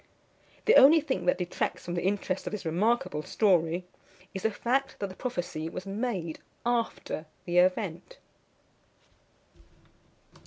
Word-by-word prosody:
The 460 +1 +7
only 305 +5 +9
thing 275 - -3
that 180 - +4
detracts 180 -1 -3
from 175 - -4
the 175 - -1
interest 190 -1 -1
of - - -2
this 210 -4 -5
remarkable 180 0 +1
story 175 -2 +2 0.5
is 190 - -4
the 220 - +2
fact, 260 +5 -1
that 200 - -3
the 185 - -10
prophecy 175 -9 -3
was 180 - -7
made 195 -5 -3 0.3
after 230 -9 -1 0.2
the 175 0 +3
event. 185 - 0
190 Hz, 130 wpm, -29 LUFS, 175-235 Hz, 0.5 s, only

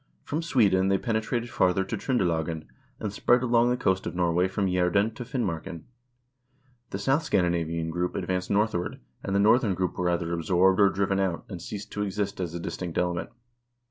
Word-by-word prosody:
From 155 +3 -2
Sweden 105 - +3
they 95 0 +3
pene 110 +2 -1
trated 120 +1 -3
farther 90 +1 +2
to 95 - -4
Tr0ndelagen, 85 - -1 0.3
and 105 -2 -4
spread 120 +4 +3
along 120 -1 +3
the 125 - +1
coast 95 -5 0
of 85 - -5
Norway 90 0 +2
from 95 +1 -1
Jsederen 90 +4 +2
to 120 - -6
Finmarken. 90 - -3 1.1
The - - -4
south 135 +9 +2
Scandinavian 85 - 0
group 90 +1 -2
ad - - -2
vanced 90 0 -1
northward, 100 -4 0 0.2
and 95 - -2
the - - +3
northern 110 -1 +4
group 90 0 -2
were 90 -1 +1
either 85 -1 -1
absorbed 90 +3 +3
or 100 -1 +6
driven 95 0 0
out, 95 -3 -1
and 90 -4 -7
ceased 100 +3 -7
to 105 - -3
exist 100 0 -2
as 85 -2 -4
a - - -3
distinct 85 0 -5
element. 90 -1 -1
95 Hz, 190 wpm, -27 LUFS, 85-105 Hz, 1.1 s, or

